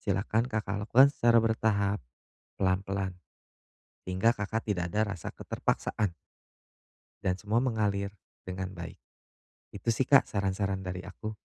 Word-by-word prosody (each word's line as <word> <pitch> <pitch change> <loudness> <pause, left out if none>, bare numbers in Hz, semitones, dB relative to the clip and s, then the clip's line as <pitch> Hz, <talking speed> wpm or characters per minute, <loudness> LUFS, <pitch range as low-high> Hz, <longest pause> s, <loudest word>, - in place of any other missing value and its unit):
silakan 105 +3 0
Kakak 105 -2 -2
lakukan 130 +4 +7
secara 115 -3 +4
bertahap, 105 -3 +1 0.6
pelan-pelan. 95 0 0 0.9
Sehingga, 95 +6 +3
Kakak 110 0 -3
tidak 90 -4 0
ada 105 -1 +1
rasa 90 - -6
keterpaksaan. 100 -5 -1 1.1
Dan 95 -1 0
semua 110 +4 +1
mengalir 105 -5 0 0.3
dengan 95 0 -4
baik. 85 -1 -8 0.8
Itu - - -1
sih, 125 +3 +1
Kak, 140 -2 +6
saran-saran 95 -1 -1
dari 90 0 -5
aku. 110 +2 -6
100 Hz, 120 wpm, -30 LUFS, 95-110 Hz, 1.1 s, lakukan